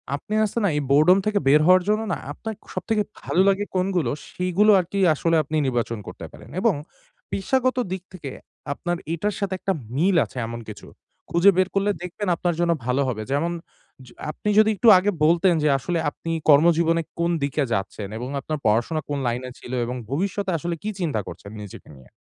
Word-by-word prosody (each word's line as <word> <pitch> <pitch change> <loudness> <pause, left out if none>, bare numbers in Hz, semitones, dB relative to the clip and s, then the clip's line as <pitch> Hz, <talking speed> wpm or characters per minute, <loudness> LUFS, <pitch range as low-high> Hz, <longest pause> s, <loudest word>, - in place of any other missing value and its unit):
আপনি 145 +9 -7
আছে 210 - -6
না, 200 - +4
এই 150 - +1
বোরডম 155 +7 +6
থেকে 210 -1 +1
বের 150 +3 +6
হওয়ার 185 +1 +6
জন্য 215 +1 +2
না? - - -1
আপনার 220 +8 -6 0.2
সবথেকে 220 -2 0 0.2
ভালো 185 - +1
লাগে 195 +1 +1
কোনগুলো, 180 -8 +1 0.2
সেই 180 0 -2
গুলো 210 +1 +7
আর 180 - -1
কি 200 - -1
আসলে 165 +2 +1
আপনি 155 +3 -5
নির্বাচন 120 -2 -1
করতে - - -8
পারেন। - - -14
এবং 225 +1 +3 0.6
পেশাগত 255 +6 0
দিক 190 -1 -4
থেকে, 150 -7 -7 0.4
আপনার 175 +4 -3 0.2
এটার 205 +5 -2
সাথে 200 -2 -2
একটা 195 - 0 0.2
মিল 180 +7 +2
আছে, - - -13
এমন 115 0 -6
কিছু 105 - -10 0.4
খুঁজে 175 +4 +6
বের 185 0 +3
করলে 200 +1 +2
দেখবেন 180 +3 -5
আপনার 175 0 -1
জন্য 175 0 +2
ভালো 125 +2 +1
হবে। 115 -4 -2
যেমন 165 +5 0 0.5
য - - -15 0.2
আপনি 210 - -4
যদি 215 0 +5
একটু 230 +4 +1
আগে 200 +3 +1
বলতেন, 170 +3 +4
যে, 150 - +3
আসলে 165 +5 -2
আপনি 165 +3 -7 0.2
কর্মজীবনে 165 +2 +5 0.2
কোন 170 +1 +1
দিকে 140 +1 0
যাচ্ছেন? 100 +1 -3
এবং 125 +2 -5
আপনার 155 +3 -4
পড়াশোনা 120 +9 +1
কোন 145 -1 -1
লাইনে 125 +2 -2
ছিল? - - -10
এবং 125 +2 -4
ভবিষ্যতে 195 +6 -1
আসলে 170 +2 -3
কী 215 - -2
চিন্তা 155 -10 -1
করছেন 100 - -9
নিজেকে 100 - -11
নিয়ে? 65 -2 -17
170 Hz, 195 wpm, -23 LUFS, 140-195 Hz, 0.6 s, গুলো